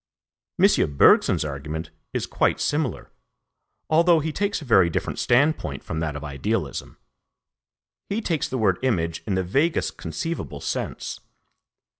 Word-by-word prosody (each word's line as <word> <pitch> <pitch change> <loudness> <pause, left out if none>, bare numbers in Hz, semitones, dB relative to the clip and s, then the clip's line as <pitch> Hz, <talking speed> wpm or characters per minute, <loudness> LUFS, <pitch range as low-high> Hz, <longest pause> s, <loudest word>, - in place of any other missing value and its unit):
M. 70 -2 +3
Bergson's - - +5
argument 75 +3 -5 0.2
is - - -2
quite - - +1
similar, 145 -3 -1 0.8
although 165 +1 +4
he 155 +1 -2
takes 200 +5 -1
a 155 - -10
very 95 -8 +5
different - - -3
standpoint 120 - +1
from 80 - -4
that 80 -2 -2
of 75 - -6
idealism. 70 -2 -3 1.1
He 205 - -1
takes 165 - -1
the 130 - -2
word 100 -6 +2
image 85 -11 0
in 100 - 0
the 95 - 0
vaguest 140 - 0
conceivable 165 - -4
sense. - - -4
105 Hz, 135 wpm, -24 LUFS, -, 1.1 s, Bergson's